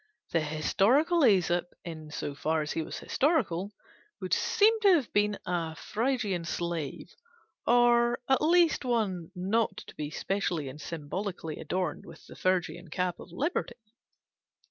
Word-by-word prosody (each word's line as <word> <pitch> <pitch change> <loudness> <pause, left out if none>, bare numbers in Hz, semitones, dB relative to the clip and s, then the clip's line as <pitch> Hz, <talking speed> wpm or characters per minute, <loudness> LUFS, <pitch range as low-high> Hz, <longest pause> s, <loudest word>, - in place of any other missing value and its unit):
The 165 - +3
historical 205 - +2
Æsop, 180 - +4 0.2
in 160 -3 -7
so 145 -1 -4
far 155 +2 0
as 150 - -4
he 165 - -1
was - - -6
historical, 210 - 0 0.5
would - - -3
seem 445 +1 +3
to 395 -3 +7
have 280 -9 -1
been 205 0 +2
a 165 -3 -2
Phrygian 220 -4 -1
slave, 170 -4 -4 0.5
or 240 0 +4
at 265 - +3
least 340 -1 +4
one 210 -9 -1
not 195 +3 0
to - - -12
be 150 -1 -5
specially 170 -4 -2
and 145 +4 -10
symbolically 165 +2 -5
adorned 180 -4 -3
with 165 -1 -13
the - - -12
Phrygian 175 -1 -1
cap 180 +2 -2
of - - -11
liberty. 260 - -2
185 Hz, 145 wpm, -29 LUFS, 165-240 Hz, 0.5 s, to